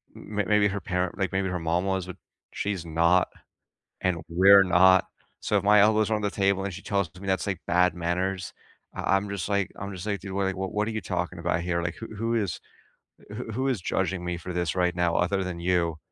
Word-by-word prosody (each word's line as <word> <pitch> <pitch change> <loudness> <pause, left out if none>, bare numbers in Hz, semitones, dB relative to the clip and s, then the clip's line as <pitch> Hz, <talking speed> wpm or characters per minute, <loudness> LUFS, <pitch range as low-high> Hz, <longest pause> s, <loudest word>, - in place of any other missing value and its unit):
m 105 0 -7
m 100 - 0
maybe 105 0 +4
her 100 - -3
parent 90 -1 -2
like, 95 -2 -1
maybe 95 0 0
her 90 -1 -2
mom 85 +3 0
was, 95 -2 -1
but 90 - -8 0.4
she's 100 -4 -3
not, 85 +3 +3 0.7
and 90 -2 +1
we're 95 +3 +7
not. 95 +1 +5 0.3
So 105 - 0
if 100 - -1
my 105 +1 +6
elbows 110 +1 +3
are - - +3
on 105 - -2
the 105 - 0
table, 100 -1 +1
and 100 -1 -4
she 95 - -8
tells 100 -4 -1
me 100 - -9
that's, 95 +2 0
like, 100 - -3
bad 90 +1 +3
manners, 90 +2 -2 0.4
I 95 - +1
I'm 100 +1 -4
just 100 -1 -4
like 100 -1 0
I'm 100 +1 -6
just 90 0 -7
like, 100 -2 -2
"Dude, 95 -1 -8
what, 100 0 0
like 95 0 -2
what 95 0 -3
what 105 +1 0
are - - -2
you 110 -1 -3
talking 90 0 -3
about 85 0 0
here? 85 0 -1
Like, 85 0 -3
who 115 - -9
who 115 +2 -1
is 100 -7 -1 0.7
who 110 +2 -6
who 130 +5 -1
is 125 -7 0
judging 95 0 -1
me 90 0 -3
for 90 +2 -6
this 85 -4 -1
right 90 -1 +1
now 85 -1 +1
other 95 +2 +1
than 90 -2 -5
you?" 85 -2 0
95 Hz, 240 wpm, -26 LUFS, 90-100 Hz, 0.7 s, we're